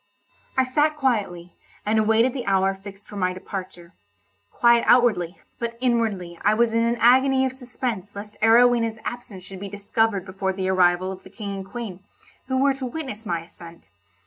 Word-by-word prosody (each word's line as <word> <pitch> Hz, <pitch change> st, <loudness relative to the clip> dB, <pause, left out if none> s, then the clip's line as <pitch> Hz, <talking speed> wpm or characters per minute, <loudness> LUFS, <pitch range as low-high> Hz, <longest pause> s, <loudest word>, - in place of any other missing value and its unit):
I 260 Hz, -, +5 dB
sat 300 Hz, +4 st, +1 dB
quietly, 200 Hz, -10 st, -1 dB, 0.3 s
and 215 Hz, +1 st, +2 dB
awaited 225 Hz, +3 st, +3 dB
the 250 Hz, -5 st, -5 dB
hour 195 Hz, 0 st, +2 dB
fixed 195 Hz, +1 st, -12 dB
for 205 Hz, -, -10 dB
my 185 Hz, -1 st, 0 dB
departure—quiet 170 Hz, -, -2 dB
outwardly, 195 Hz, -8 st, +3 dB, 0.2 s
but 235 Hz, 0 st, -4 dB
inwardly 220 Hz, -9 st, -1 dB
I 210 Hz, +1 st, +4 dB
was 230 Hz, 0 st, +2 dB
in 230 Hz, 0 st, +2 dB
an 235 Hz, +1 st, +1 dB
agony 265 Hz, +3 st, +5 dB
of 260 Hz, -, -2 dB
suspense 240 Hz, -6 st, -5 dB
lest 210 Hz, +1 st, -9 dB
Arowhena's 230 Hz, 0 st, +4 dB
absence 235 Hz, -6 st, -7 dB
should 190 Hz, 0 st, -10 dB
be 200 Hz, +1 st, -6 dB
discovered 205 Hz, 0 st, 0 dB
before 190 Hz, 0 st, -3 dB
the 190 Hz, 0 st, -2 dB
arrival 185 Hz, 0 st, +3 dB
of 190 Hz, 0 st, -9 dB
the -, -, -14 dB
King 200 Hz, 0 st, -6 dB
and 190 Hz, -, -6 dB
Queen, 205 Hz, -4 st, -6 dB, 0.5 s
who 260 Hz, 0 st, 0 dB
were 275 Hz, +1 st, +3 dB
to 270 Hz, -1 st, -6 dB
witness 245 Hz, -6 st, -6 dB
my 170 Hz, -2 st, -1 dB
ascent. 170 Hz, -4 st, -14 dB
210 Hz, 170 wpm, -23 LUFS, 185-240 Hz, 0.5 s, I